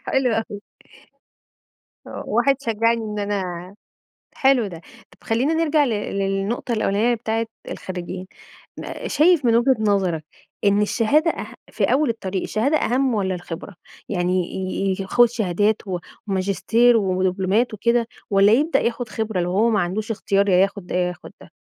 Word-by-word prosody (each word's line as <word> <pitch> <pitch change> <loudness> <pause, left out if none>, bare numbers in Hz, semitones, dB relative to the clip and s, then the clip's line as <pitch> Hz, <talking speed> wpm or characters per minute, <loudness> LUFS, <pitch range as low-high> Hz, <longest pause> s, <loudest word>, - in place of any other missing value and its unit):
حلو 265 -2 +1
أوي 220 -2 -3 1.5
آه، - - -7
واحد 275 -1 +2
شجعني 230 -1 +1
إن 210 -1 -5
أنا 190 -2 -4 0.6
حلو 265 -5 +3
ده. 170 -4 -8 0.3
طب - - -23
خلّينا 255 +8 +1
نرجع 315 -2 +2
ل - - -1
للنقطة 200 +2 -2
الأولانية 220 +2 +1
بتاعة 225 0 -2 0.2
الخريجين. 185 0 -6 0.5
ن - - -6
شايف 320 -2 +4
من 230 -1 +4
وجهة 260 +2 +3
نظرك 190 -7 +1 0.4
إن 205 +1 +4
الشهادة 290 +10 +2
أه - - -5 0.3
في - - 0
أول 285 +2 +2
الطريق 190 -4 -3
الشهادة 265 +8 0
أهَم 260 -2 +1
والّا 190 -3 0
الخبرة؟ 175 +2 -8 0.3
يعني 180 -1 0
ي 190 +1 -2
ي - - -3
ياخُد 240 +6 +4
شهادات 210 -1 0
و 180 -2 -2 0.3
وماجستير 205 +5 +2
ودبلومات 190 +3 +1
وكده، 235 +2 +1 0.2
والّا 195 +1 +5
يبدأ 300 +8 +3
ياخد 235 0 -2
خبرة 215 -2 -2
لو 175 - -1
هو 220 +5 +3
ما 210 -2 +2
عندوش 205 +6 -3
اختيار 200 -1 +1
يا 180 - +4
ياخد 195 0 +1
ده، - - -6
يا 180 0 +1
ياخد 175 -2 -9
ده؟ - - -15
210 Hz, 155 wpm, -22 LUFS, 190-235 Hz, 1.5 s, والّا